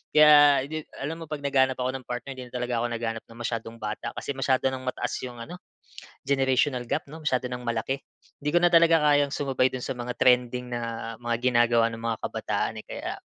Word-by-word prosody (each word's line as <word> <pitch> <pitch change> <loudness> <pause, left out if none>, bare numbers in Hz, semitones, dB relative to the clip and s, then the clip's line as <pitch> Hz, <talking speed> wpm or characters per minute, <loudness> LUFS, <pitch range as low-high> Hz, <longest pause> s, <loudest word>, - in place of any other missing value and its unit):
Kaya 145 -2 +7
'di 155 +2 -6 0.2
alam 160 +4 -4
mo 165 - -7
'pag 150 -1 -6
naghahanap 130 -2 +2
ako 130 - 0
ng 130 - -18
partner. 125 +2 -5
Hindi 125 - -7
na 120 - -13
talaga 125 -1 -1
ako 120 - 0
naghahanap 115 -1 -3
ng 115 +1 -14
masyadong 115 -1 -4
bata. 105 -2 -5
Kasi - - -4
masyado 135 -1 +1
nang 130 -1 -6
mataas - - -2
'yong 120 -2 -7
ano, 180 +9 -9 0.7
generational 130 -2 +1
gap, 155 - -1
'no? 160 +3 -11
Masyado 130 -5 0
nang 125 0 -4
malaki. 120 +3 -2 0.4
Hindi 150 - -1
ko 175 - +3
na 175 - +3
talaga 165 0 +6 0.2
kayang 145 -1 +3
sumabay 135 -2 +1
do'n 130 -1 -5
sa 135 - -2
mga 125 0 -5
trending 125 -1 +2
na 120 - -2 0.4
mga 120 -1 -1
ginagawa 120 -1 +3
ng 115 - -7
mga 115 -1 -1
kabataan, - - -2
eh. - - -39
Kaya - - -6
130 Hz, 210 wpm, -26 LUFS, 120-140 Hz, 0.7 s, Kaya